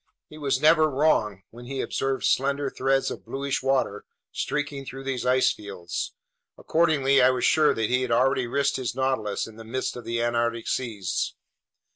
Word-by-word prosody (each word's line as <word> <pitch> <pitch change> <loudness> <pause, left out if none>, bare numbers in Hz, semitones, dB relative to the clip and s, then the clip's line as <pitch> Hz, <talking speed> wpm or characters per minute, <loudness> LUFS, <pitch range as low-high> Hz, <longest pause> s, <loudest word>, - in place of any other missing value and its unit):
He 155 - -11
was 140 -3 0
never 155 +1 +5
wrong 120 -9 +1
when 120 +1 -11
he 135 0 -4
observed 135 0 -1
slender 140 +1 +1
threads 135 +1 +1
of - - -7
bluish 140 0 -3
water 130 -6 0 0.3
streaking 145 -2 -3
through 135 0 -8
these 130 -2 -3
ice 130 +1 +4
fields. 95 -4 -6 0.4
Accordingly, 140 -5 +3
I 125 - +6
was 130 -2 0
sure 155 -1 +4
that 115 +1 -1
he 125 0 +2
had 130 - -2
already 130 +1 +2
risked 140 +3 0
his 120 -3 -3
Nautilus 130 -6 -1
in 115 -1 -12
the 115 - -9
midst 130 +4 -3
of 125 - -7
the 115 0 -2
Antarctic 120 -1 0
seas. 105 -8 -2
130 Hz, 175 wpm, -25 LUFS, 115-140 Hz, 0.4 s, I